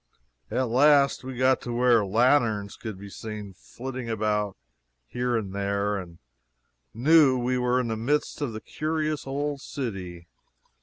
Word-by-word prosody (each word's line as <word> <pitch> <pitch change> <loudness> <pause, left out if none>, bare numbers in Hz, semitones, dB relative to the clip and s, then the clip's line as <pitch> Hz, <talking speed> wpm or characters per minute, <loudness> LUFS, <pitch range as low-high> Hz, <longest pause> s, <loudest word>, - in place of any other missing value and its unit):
At 130 0 0
last 140 +3 +4
we 130 -1 -7
got 130 +1 +3
to 120 - -5
where 120 -2 +4
lanterns 110 -1 +2
could 110 -4 -7
be 100 +1 -10
seen 105 -2 -7
flitting 125 +5 -7
about 105 -2 -1 0.5
here 125 - -1
and 100 -4 -4
there, 100 +1 -1
and 90 -4 -7 0.7
knew 135 +3 +5
we 125 +1 0
were 125 0 +2
in 125 -2 -1
the 110 - -1
midst 145 +7 -1
of 140 -5 -1
the 110 0 -7
curious 155 -1 -2
old 140 +1 -2
city. 95 -12 -6
120 Hz, 150 wpm, -26 LUFS, 105-130 Hz, 0.7 s, knew